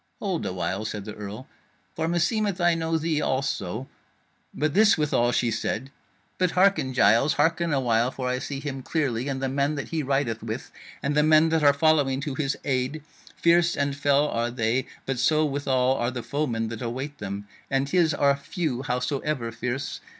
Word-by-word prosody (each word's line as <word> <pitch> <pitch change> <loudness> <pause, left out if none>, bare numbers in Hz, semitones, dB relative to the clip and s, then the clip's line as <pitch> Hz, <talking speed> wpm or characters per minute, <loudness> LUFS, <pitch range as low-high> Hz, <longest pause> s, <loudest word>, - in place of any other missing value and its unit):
"Hold 190 -5 -2
a - - -2
while," 95 +2 -2
said 105 -2 -5
the 105 - -6
carle, 105 +4 -8 0.5
"for 160 0 -1
meseemeth 195 +3 0
I 175 -1 +4
know 165 0 0
thee 160 -1 0
also. 130 -3 -2 0.6
But 155 -1 -1
this 210 +1 +5
withal 145 -6 +2
she 120 -1 +1
said: 130 +4 -3 0.5
'But 185 -1 +3
hearken, 185 -9 +3
Giles, 115 +5 +4
hearken 165 +3 +1
a 140 - +2
while, 120 -1 +2
for 130 -1 -4
I 125 0 0
see 140 0 -5
him 135 -2 -5
clearly, 130 -4 -1
and 135 -1 -3
the - - +1
men 140 +3 0
that 145 - -5
he 160 -1 -1
rideth 135 -5 -1
with, 110 +2 -5 0.3
and 140 - 0
the 150 - +5
men 155 +1 +5
that 160 0 +2
are 145 - +7
following 145 -2 +2
to 145 -2 -3
his 135 0 -1
aid, 135 +2 -1 0.3
fierce 170 0 +3
and 140 -1 0
fell 145 +1 +3
are 120 -3 -1
they; 120 +1 0 0.2
but 135 -2 -2
so 155 +4 +3
withal 130 -3 +1
are 120 - 0
the 125 -2 -5
foemen 120 -7 -2
that 115 -1 -6
await 130 +5 -4
them, 100 0 -5 0.2
and 135 0 0
his 170 -2 +3
are 140 -1 +3
few, 140 -2 -3
howsoever 125 -1 -2
fierce. 125 +4 -4
140 Hz, 190 wpm, -25 LUFS, 125-155 Hz, 0.6 s, are